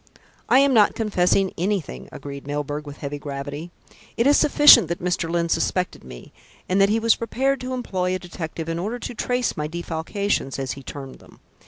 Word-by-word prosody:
"I - - +6
am 275 0 +4
not 215 -4 +4
confessing 195 -3 +1
anything," 170 - -2
agreed 140 -1 -8
Mr. - - -14
Milburgh 145 +1 -4
with 145 - -9
heavy 145 0 -5
gravity. 145 +3 -6 0.5
"It 235 - +2
is 285 +1 +5
sufficient 295 - +7
that 170 +1 -2
Mr. 180 -1 -1
Lyne 170 0 0
suspected 180 +2 -1
me, - - -12 0.3
and 190 +2 +2
that 195 - +5
he 220 +2 +2
was 225 0 +4
prepared 265 +4 -1
to 255 0 -4
employ 185 -7 -2
a - - 0
detective 165 -2 -7
in 165 0 -2
order 215 +7 -3
to 245 - -6
trace 245 +2 -1
my 150 0 -3
defalcations, 170 0 -2
as 135 -2 -3
he 135 - -7
termed 135 0 -9
them. - - -19
175 Hz, 195 wpm, -23 LUFS, 145-220 Hz, 0.5 s, sufficient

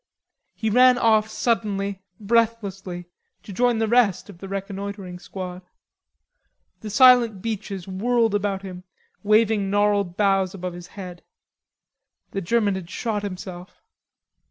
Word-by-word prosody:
He 220 -1 -1
ran 250 +2 +6
off 220 -2 +3
suddenly, 200 -4 -1 0.2
breathlessly, 200 -5 -1 0.4
to 200 - -9
join 245 +3 +2
the 225 0 0
rest 215 -4 +2
of 170 - -17
the 195 - -8
reconnoitering 195 -1 -5
squad. 180 -1 -7 1.2
The 215 - -7
silent 240 -2 +6
beeches 205 -4 -4
whirled 225 +3 +1
about 200 -1 -1
him, 180 -2 -8 0.4
waving 215 -1 +2
gnarled 205 -3 +1
boughs 195 -2 +2
above 180 -1 -5
his 175 0 -10
head. 180 -3 -8 1.1
The 195 - -3
German 205 +2 +1
had 190 -3 -6
shot 210 +2 -2
himself. 185 -2 -8
200 Hz, 125 wpm, -23 LUFS, 190-220 Hz, 1.2 s, ran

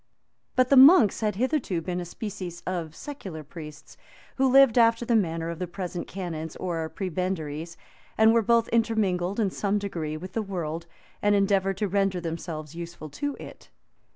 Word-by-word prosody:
But 255 0 +3
the 275 - +5
monks 265 - +7
had 210 -3 0
hitherto 250 - 0
been 180 +2 -3
a 175 - -4
species 185 -2 -7
of 170 -4 -4
secular 190 - -8
priests, 150 -1 -11 0.4
who 265 0 +3
lived 270 -3 +6
after 230 +1 +4
the 235 - +2
manner 165 -5 0
of 170 - -7
the 180 - -3
present 175 0 -5
canons 165 -4 -5
or 165 -3 -3
prebendaries, 170 -4 -4 0.4
and 220 +1 +6
were 230 - +4
both 230 +1 +3
intermingled, 205 -5 +1
in 205 -4 +1
some 200 +2 0
degree, 165 -7 -4
with 185 +4 -9
the 225 - 0
world, 170 -5 -4 0.3
and 205 0 +3
endeavored 195 -1 +2
to 210 - 0
render 195 -1 +1
themselves 165 -2 -5
useful 170 -3 -8
to 285 - -3
it. - - -12
185 Hz, 170 wpm, -26 LUFS, 170-220 Hz, 0.4 s, monks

